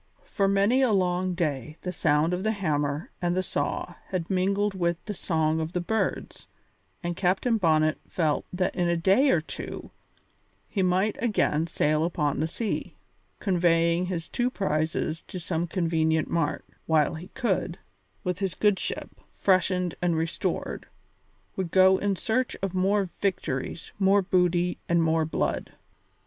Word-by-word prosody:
For 195 - 0
many 200 +6 +3
a 255 -4 +3
long 185 -2 +1
day 155 -3 -2
the 180 - -3
sound 160 -1 +2
of 180 - -1
the 220 +2 +1
hammer 150 -6 -1
and 175 0 0
the 185 - +1
saw - - -2
had 180 -1 -3
mingled 195 +2 +1
with 170 -2 0
the 210 - -3
song 160 -3 0
of 160 +2 -3
the 180 - 0
birds, 220 +5 -2 0.6
and 175 0 -2
Captain 195 +6 +1
Bonnet 155 -3 +3
felt 155 -4 0
that 185 0 0
in 175 -2 +1
a 170 - +2
day 195 +12 +4
or 170 - +3
two 160 - -7 0.8
he 200 - -1
might 185 +3 +1
again 170 -8 +1
sail 155 -2 +1
out - - +2
upon 150 -5 -1
the 160 - +1
sea, 215 +6 -3 0.4
conveying 170 -1 +2
his 170 -3 -3
two 245 +1 0
prizes 160 -5 -1
to 185 - -6
some 170 0 -2
convenient 160 -2 +1
mart, 165 -4 -1 0.2
while 155 -1 +3
he, 170 +4 -8 0.9
with 180 0 -2
his 190 -3 -2
good 205 -2 +2
ship, - - -3 0.2
freshened 185 -2 +2
and 175 -2 +1
restored, 165 +1 -2 0.7
would 190 -3 -2
go 190 +1 +5
in 200 -1 0
search 245 +7 -1
of 195 -2 -1
more 195 +2 +2 0.2
victories, 165 -6 -2
more 195 0 +4
booty, 180 -1 +1
and 170 -1 +3
more 160 0 +2
blood. 160 - -2
180 Hz, 155 wpm, -27 LUFS, 160-195 Hz, 0.9 s, go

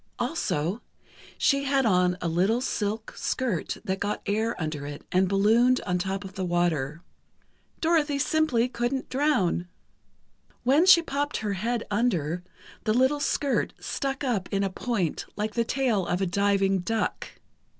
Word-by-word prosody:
Also, 170 +10 -1 0.6
she 275 -1 +2
had 270 -1 +2
on 180 -3 +3
a 175 - -1
little 185 +8 +2
silk 220 -3 -2
skirt 235 -11 -2
that 190 -2 -1
got 205 +1 -2
air 220 +2 -1
under 155 -3 -3
it 145 0 -8
and 185 0 +3
ballooned 225 +6 +4
on 180 -2 -1
top 195 +2 -2
of 190 - -9
the 190 -1 -4
water. 170 -3 0 0.8
Dorothy 315 -3 +2
simply 280 -5 +2
couldn't 250 +2 -2
drown. 255 - +1 1.0
When 285 +8 +4
she 345 -3 +8
popped 290 -1 -2
her 210 -2 -2
head 230 +5 -2
under, 180 -7 0 0.4
the 215 0 +2
little 260 +4 +3
skirt 285 -1 0
stuck 275 0 -3
up 225 -9 -1
in 200 0 +1
a 195 - -1
point 195 -5 -2
like 210 +1 -2
the 235 - +1
tail 230 -6 0
of 175 - 0
a 195 - +1
diving 195 +1 +2
duck. 220 +5 -2
210 Hz, 150 wpm, -26 LUFS, 185-260 Hz, 1.0 s, she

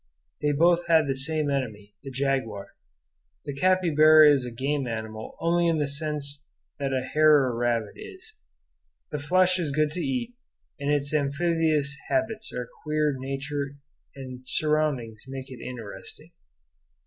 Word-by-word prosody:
They 150 - +2
both 170 +3 +3
had 160 -2 +5
the 135 -1 -1
same 150 +1 -1
enemy, 110 -7 -3
the 135 - -8
jaguar. 130 -6 -2 0.8
The 145 - -4
capybara 155 -2 +6
is 135 -3 +2
a - - -4
game 135 +3 -1
animal 110 -1 -6
only 170 +1 +2
in 165 -1 +2
the 150 - +1
sense 145 0 -3 0.3
that 140 -1 -1
a 130 -1 0
hare 150 +1 +5
or 125 -2 -1
rabbit 120 -1 0
is. 420 +1 -11 0.8
The 150 - -2
flesh 185 +5 +3
is 160 -5 -1
good 150 +1 +1
to 180 - -4
eat, 250 -3 -2 0.5
and 140 0 -2
its 145 0 0
amphibious 150 0 +1
habits 220 0 -1
and 125 - -4 0.2
queer 150 -1 +1
nature 140 +1 -4 0.4
and 130 -2 -8
surroundings 135 -6 -1
make 135 0 -7
it 125 - -9
interesting. 115 -5 -8
145 Hz, 150 wpm, -26 LUFS, 130-155 Hz, 0.8 s, capybara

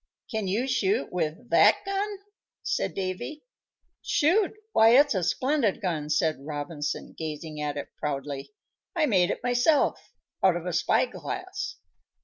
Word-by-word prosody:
"Can 220 -4 -2
you 220 +8 0
shoot 205 - 0
with 175 +7 -3
that - - +5
gun?" 395 +1 -2 0.5
said - - -1
Davy. 190 +11 -4 0.6
"Shoot! 360 +7 +2 0.2
Why, 225 - +6
it's 285 -2 +4
a 190 - 0
splendid 255 - +1
gun!" 160 -6 -2
said 155 0 +2
Robinson, 145 0 -4
gazing 155 -1 -5
at 145 -1 -2
it 145 - -5
proudly. 140 0 -4 0.4
"I 320 -3 +3
made 185 -9 +3
it - - -3
myself 245 +5 +2 0.3
out 185 -2 +5
of 175 0 -4
a 180 - -2
spy 175 - +3
glass." 375 -4 -5
190 Hz, 140 wpm, -27 LUFS, -, 0.6 s, Why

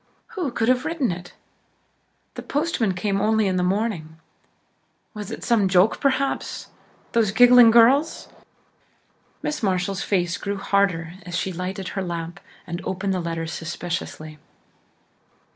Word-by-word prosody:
Who 375 - -3
could 230 -2 -1
have 255 0 +3
written 315 - -1
it? 175 +1 -8 1.0
The - - -7
postman 280 - -1
came 195 +2 -1
only 220 0 +2
in 185 -1 0
the - - +1
morning. 180 -4 -1 1.0
Was 210 -3 -7
it - - -7
some 220 -5 +3
joke, 185 +3 +3
perhaps? 275 0 -1 0.4
Those 225 -3 +2
giggling 245 +2 +7
girls? 255 +7 +4 1.2
Miss 300 - -2
Marshall's 190 -1 -1
face 180 -2 0
grew 200 0 -4
harder 195 -5 0
as 180 0 -4
she 190 +1 -2
lighted 185 +2 -4
her 195 - -3
lamp 170 -1 -5 0.3
and 170 +1 -5
opened 190 +1 -2
the 185 - -1
letter 165 -1 -3
suspiciously. 160 -2 -5
195 Hz, 135 wpm, -23 LUFS, 180-230 Hz, 1.2 s, giggling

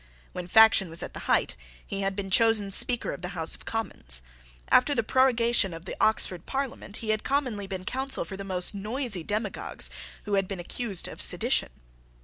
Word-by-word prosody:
When 180 -1 -7
faction 220 -2 +5
was 165 +1 +5
at - - -8
the - - -7
height, - - +1 0.3
he 195 - -4
had 195 0 -2
been 195 -1 -5
chosen 220 -2 +3
Speaker 245 +4 +5
of - - -9
the 180 +1 -7
House 160 0 +3
of - - -10
Commons. 60 - -2 0.5
After 285 +3 +4
the 230 - 0
prorogation 235 -6 +2
of 165 +1 -11
the - - -6
Oxford 185 -5 0
Parliament 265 -6 -4
he - - -5
had 215 0 0
commonly 250 -8 -2
been 185 -1 -6
counsel 265 -4 -2
for 190 - -7
the 195 - -7
most 185 -1 0
noisy 210 - -3
demagogues 210 +2 0 0.3
who 205 - -5
had 195 -1 +1
been 195 -2 -6
accused 195 +2 -2
of - - -7
sedition. - - +1
205 Hz, 190 wpm, -26 LUFS, 185-230 Hz, 0.5 s, faction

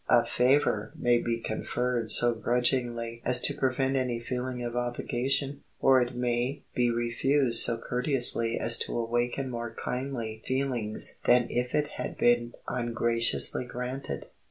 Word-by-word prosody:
A 120 - +4
favor 120 -3 +1
may 120 -1 +1
be 115 0 -2
conferred 120 +1 -3
so 120 +2 +5
grudgingly 120 0 -2
as 125 -1 +4
to - - +3
prevent 135 0 -1
any 125 -3 -1
feeling 125 +1 -5
of 120 0 -5
obligation, 125 +3 -2 0.2
or 130 -1 +4
it 120 0 -3
may 125 +2 -2
be 120 -1 +1
refused 120 +2 +4
so 115 - +3
courteously 125 -2 +2
as 115 +1 +3
to - - -3
awaken 120 +3 -2
more 120 -1 -6
kindly 120 -4 -5
feelings 130 -5 -1
than 120 -1 +3
if 125 0 -2
it 150 -1 +1
had - - -5
been 120 0 +2
ungraciously 120 0 0
granted. 125 +2 -6
120 Hz, 140 wpm, -27 LUFS, 115-130 Hz, 0.2 s, so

